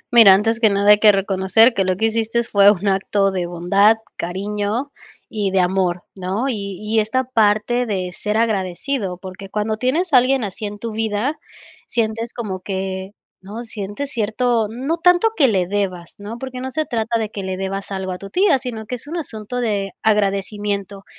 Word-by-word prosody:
Mira, 205 -5 +9
antes 225 +3 +1
que 220 - +5
nada 200 +1 +4
hay 210 - +6
que 215 -1 +7
reconocer 195 +4 +3
que 195 -4 +1
lo 185 -1 0
que 220 - +1
hiciste 225 +1 0
fue 200 -3 +5
un 200 0 -2
acto 195 +1 +1
de 180 -2 -2
bondad, 195 +5 +3 0.2
cariño 205 +8 -3 0.4
y 210 -4 -2
de 190 0 +1
amor, 180 -1 +1
¿no?, 195 +8 -2
y 200 -5 -4
y 215 +1 0
esta 240 +5 0
parte 235 0 +1
de 185 -3 -2
ser 210 +4 -2
agradecido, 200 0 -1
porque 190 +1 -10
cuando 215 +1 -2
tienes 300 +8 0
a - - +9
alguien 255 0 +3
así 205 +1 -4
en 205 0 -7
tu 230 +2 -5
vida, 220 +7 -2 0.5
sientes 225 0 -2
como 200 -6 -5
que 190 0 -4 0.3
¿no?, 210 +5 -7
sientes 215 +5 -5
cierto, 225 +1 0
no 265 +9 -2
tanto 355 +5 +4
que 285 -8 +4
le 190 -6 +1
debas, 185 -3 -3
¿no?, 210 +3 -7
porque 255 0 -7
no 260 - -4
se 310 +4 -2
trata 230 -2 -1
de 220 -2 -2
que 200 - -5
le 190 -1 -4
debas 195 +1 -4
algo 190 -1 -3
a 180 - -5
tu 195 - -9
tía, 360 - +3
sino 235 -4 -6
que 250 - -7
es 245 - -11
un 330 +4 -4
asunto 245 -5 -5
de 200 -4 -1
agradecimiento 200 -1 -1
210 Hz, 195 wpm, -20 LUFS, 195-235 Hz, 0.5 s, Mira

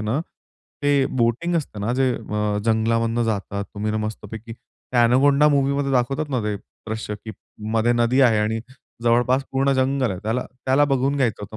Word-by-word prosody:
ना, 110 +7 -1 0.6
ते 145 -1 +3
बोटिंग 120 +9 +1
असते 135 -9 -4
ना, 110 +4 -1
जे 130 -1 +2
अ, 105 -1 -2
जंगलामधून 115 +1 +1
जातात 100 -2 -2
तुम्ही 105 +1 -2
न - - -3
मस्तपैकी. 110 +1 -7
त्या 120 +1 -2
एनाकोंडा 140 +5 +4
मूव्हीमध्ये 140 -1 +1
दाखवतात 135 +4 0
ना, 125 -3 0
ते 105 -1 -2
दृश्य 110 +1 -7
की 110 - -6 0.4
मध्ये 115 +1 +3
नदी 120 +2 +2
आहे 120 -5 +5
आणि 110 +1 0 0.4
जवळपास 120 +3 +2
पूर्ण 135 +1 +2
जंगल 130 -2 +1
आहे. 95 - -4
त्याला, 115 +4 -1 0.2
त्याला 135 +3 +4
बघून 135 +2 0
घ्यायचं 120 -7 0
होतं 105 +2 -8
120 Hz, 170 wpm, -22 LUFS, 110-135 Hz, 0.6 s, आहे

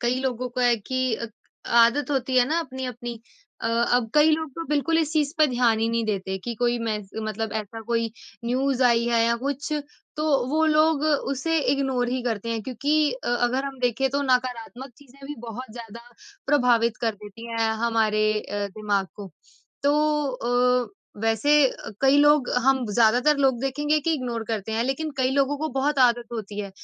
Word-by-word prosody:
कई 245 +2 0
लोगों 255 -1 -2
का 250 - +1
है 240 -1 +4
कि 255 +3 -1
अ, 230 - -5 0.4
आदत 235 +5 +4
होती 260 -2 0
है 250 - +6
ना 320 +2 +1
अपनी-अपनी। 250 -5 -6 0.4
अ, - - -2
अब 235 0 +1
कई 300 +1 +6
लोग 315 -1 0
तो 330 - -5
बिल्कुल 300 +3 +1
इस 315 -2 0
चीज़ 300 -2 +1
पे 310 - +6
ध्यान 245 -3 +2
ही 225 +1 +1
नहीं 230 0 0
देते 190 -3 -2
कि 240 - -3
कोई 240 +1 0
मैस 215 -4 -4 0.2
मतलब 215 0 -3
ऐसा 215 +2 -9
कोई 230 -1 0 0.3
न्यूज़ 260 +2 0
आई 235 -1 +4
है 235 -1 +3
या 235 0 +2
कुछ 285 +2 -3 0.4
तो 305 - -2 0.2
वो 310 +3 +2
लोग 310 -1 +3 0.3
उसे 325 +5 0
इग्नोर 265 -3 0
ही 255 0 -2
करते 230 -2 -3
हैं 225 -1 -2
क्योंकि 265 +5 -1 0.2
अ, 255 - -6
अगर 245 +2 0
हम 275 -1 -6
देखें 250 +2 +1
तो 280 +2 0
नकारात्मक 255 0 -2
चीज़ें 275 -1 -19
भी 295 - -6
बहुत 230 +1 -8
ज़्यादा 230 -1 -9 0.5
प्रभावित 240 -5 +3
कर 225 -2 0
देती 210 +2 -11
हैं 225 -1 +1 0.2
हमारे 215 -2 +2
अ, 205 -1 -4
दिमाग 205 -2 0
को। 200 -2 -9 0.5
तो 285 +1 +3 0.9
अ, - - -16 0.3
वैसे 225 +5 +1 0.2
अ, - - -9
कई 270 +1 +4
लोग 295 -3 +4 0.2
हम 265 -1 +3
ज़्यादातर 240 +7 +4
लोग 265 -4 +2
देखेंगे 295 +3 0
कि 325 +3 0
इग्नोर 240 -5 -4
करते 220 -1 -4
हैं। 225 +1 0
लेकिन 270 +5 -2
कई 260 -1 +1
लोगों 280 +1 +1
को 315 +2 -2
बहुत 290 +1 0
आदत 240 -2 +3
होती 210 -3 -6
है 200 -1 -6
245 Hz, 190 wpm, -24 LUFS, 230-275 Hz, 0.9 s, है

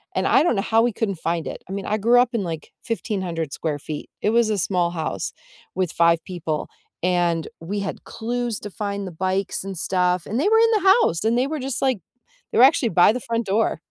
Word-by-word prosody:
and - - +1
I - - +5
don't 335 - +2
know - - +2
how 225 +1 +3
we 240 0 +2
couldn't 200 -3 -1
find 165 0 -2
it, - - -7
I - - -7
mean, 195 0 -4
I 215 - 0
grew 235 +4 +4
up 245 0 +2
in 215 -4 0
like 165 -3 -6
1,500 185 - -3
square 150 -3 -3
feet, 150 +1 -7
it 210 - +2
was 230 -1 +3
a 210 - 0
small 175 -1 +1
house 160 -3 -3 0.4
with 185 -3 0
5 170 -1 +3
people, 165 -4 -3 0.3
and 175 -2 +1
we 200 +5 -3
had 200 - -5
clues 240 0 -3
to 205 - -7
find 200 -1 -4
the - - -6
bikes 190 +3 -1
and 195 -2 -6
stuff, 180 0 +1
and 225 +4 -2
they 405 - +3
were 445 0 +5
in 460 0 +5
the 390 -3 +3
house, 165 +4 0
and 230 +2 +2
they 260 +2 +2
were 310 0 -3
just 260 -2 -3
like 260 -6 +1 0.5
they - - -1
were 245 - +8
actually 270 -4 +3
by 180 +3 +5
the 250 - -3
front 230 -1 -2
door. 210 +3 0
200 Hz, 235 wpm, -23 LUFS, 175-235 Hz, 0.5 s, were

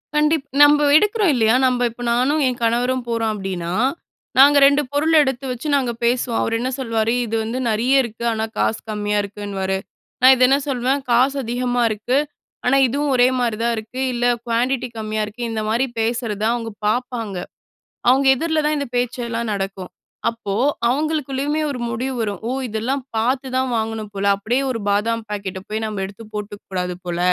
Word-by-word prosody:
கண்டிப் 300 -1 +2 0.2
நம்ப 295 0 +6
எடுக்குறோம் 420 +2 +3
இல்லயா? 225 -2 +3
நம்ப 250 -1 +1
இப்ப 235 +1 -13
நானும் 270 +6 +2
என் 250 -1 -1
கணவரும் 245 +2 +1
போறோம் 230 -1 0
அப்பிடின்னா, 185 -4 -4 0.6
நாங்க 285 +2 +7
2 280 +1 +5
பொருள் 300 +3 +1
எடுத்து 265 -1 -1
வச்சு, 250 +4 -5
நாங்க 260 -4 +1
பேசுவோம். 240 0 +1
அவரு 225 - 0
என்ன 255 +2 -1
சொல்வாரு? 230 -2 0
"இது 225 0 -3
வந்து 230 +4 -3
நிறைய 250 +5 +3
இருக்கு. 235 0 -7
ஆனா, 220 0 -1
காசு 220 - +1
கம்மியா 210 -1 -1
இருக்குன்னுவாரு." 195 -1 -3 0.4
நான் 260 +1 +8
இது 255 0 +5
என்ன 275 +1 +4
சொல்வேன், 265 +1 0
"காசு 260 +4 +3
அதிகமா 245 +1 -1
இருக்கு." 220 +5 -1 0.5
ஆனா, 260 +2 +4
இதுவும் 285 +3 -1
ஒரே 245 0 +5
மாதிரி 235 -3 0
தான் 235 0 +1
இருக்கு. 225 +4 -7
இல்ல 240 0 -1 0.2
குவான்டிட்டி 245 +2 0
கம்மியா 215 0 -2
இருக்கு. 225 +4 -7
இந்தமாரி 225 +4 0
பேசுறத 225 -2 -1
அவுங்க 230 -2 -4 0.2
பாப்பாங்க. 230 -4 -2 0.7
அவுங்க 270 +2 +4
எதிர்ல 315 +2 0
தான் 300 0 +1
இந்த 280 - -3
பேச்செல்லாம் 235 -2 -2
நடக்கும். 195 -2 -4 0.4
அப்போ 230 -4 -5 0.4
அவங்களுக்குள்ளேயுமே 295 +1 -1
ஒரு 250 - -5
முடிவு 250 +4 -3
வரும். 205 -4 -3
"ஓ! - - -1 0.2
இதெல்லாம் 235 +5 -2
பார்த்து 255 +4 0
தான் 260 0 0
வாங்கணும் 220 -1 -3
போல. 200 0 -3
அப்பிடியே 235 +7 -1
ஒரு 230 - -3
பாதாம் 225 +3 0
பாக்கெட்ட 195 -2 -4
போய் 220 +1 -3
நமப 210 -3 -3
எடுத்து 200 +4 -10
போட்டுக்கக் 205 0 -7
கூடாது 180 -1 -2
போல. 175 0 -3
235 Hz, 170 wpm, -20 LUFS, 215-265 Hz, 0.7 s, நான்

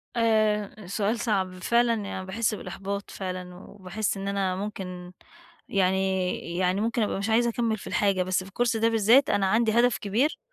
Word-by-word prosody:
آآ، 215 -3 +1
سؤال 210 +4 -1
صعب 195 -5 0
فعلًا 235 0 +3
يعني 190 -1 -5
باحس 215 +3 -1
بالإحباط 195 +1 -5
فعلًا، 180 -1 -6
وباحس 195 +2 -4
إن 195 0 -5
أنا 195 -2 0
ممكن 185 -3 -6 0.6
يعني 190 -2 0
يعني 185 +2 +1
ممكن 230 +2 0
أبقى 205 - -1
مش 200 +3 -2
عايزة 235 +2 +3
أكمل 230 -1 -1
في - - -10
الحاجة، 195 -3 +1
بس 185 0 0
في 190 - -12
الكورس 235 +2 0
ده 225 +1 +3
بالذات، 230 +5 +4
أنا 195 -1 +2
عندي 220 +3 +2
هدف 240 +2 +3
كبير 230 +9 0
200 Hz, 170 wpm, -26 LUFS, 190-225 Hz, 0.6 s, بالذات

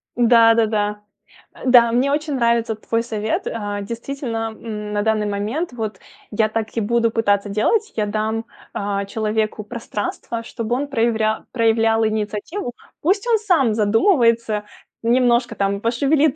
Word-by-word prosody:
Да-да-да. 225 -3 +3 0.5
А, - - -11
да, 245 -2 +6
мне 255 +4 +2
очень 295 -1 -1
нравится 235 -2 +1
твой 230 +1 -2
совет, 220 -2 -2
а, 205 -2 -3
действительно, 230 0 -4
м, 210 -2 -6
на 205 - +1
данный 220 -1 +1
момент, 220 +10 -2
вот, 220 -3 -4 0.3
я 215 +1 +2
так 220 0 -3
и 225 - +2
буду 230 +1 +1
пытаться 205 -3 +1
делать. 400 - +1
Я 210 -2 0
дам, 220 +2 -2 0.3
а, 200 0 -2
человеку 215 +1 -2
пространство, 230 +1 -5
чтобы 230 0 -3
он 280 +3 -2
прояврял 225 -4 0
проявлял 225 -1 +2
инициативу. 215 - -3 0.3
Пусть 395 +7 +1
он 460 -2 +4
сам 330 - +2
задумывается, 225 - +2 0.4
немножко 240 -1 +2
там 200 0 -1
пошевелит 280 +5 +2
225 Hz, 140 wpm, -20 LUFS, 215-240 Hz, 0.5 s, да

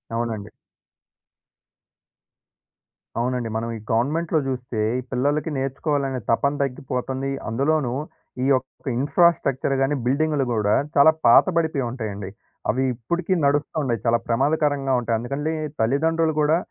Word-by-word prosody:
అవునండి. 110 -3 -3 2.7
అవునండి. 125 -1 -1
మనం 115 +1 -2
ఈ - - -9
గవర్నమెంట్‌లో 155 +8 +1
జూస్తే 125 -4 -3 0.2
ఈ - - -3
పిల్లలకి 145 +5 0
నేర్చుకోవాలనే 135 0 -1
తపన 140 +5 +2
తగ్గిపోతంది. 130 0 -3 0.2
అందులోనూ 135 +2 +1 0.5
ఈ - - +1
యొక్క 130 0 -1
ఇన్‌ఫ్రా‌స్ట్రక్చర్ 140 -2 +2
గాని, 135 +2 +2
బిల్డింగులు 145 +2 +1
గూడా 105 -2 +2 0.2
చాలా 145 +3 +7
పాత 115 - +7
బడిపోయి 160 -5 +1
ఉంటాయండి. 105 -6 -5 0.4
అవి 130 +5 +1
ఇప్పడికి 170 - -2
నడుస్త 145 +1 +1
వుండాయి. 120 -7 -1
చాలా 115 0 +3
ప్రమాదకరంగా 145 +2 +1
ఉంటాయి. 115 -1 0
అందుకని 140 +5 -4
లే 160 - 0 0.3
తల్లిదండ్రులు 160 +6 +2
గూడా 150 +2 +4
135 Hz, 120 wpm, -23 LUFS, 120-150 Hz, 2.7 s, చాలా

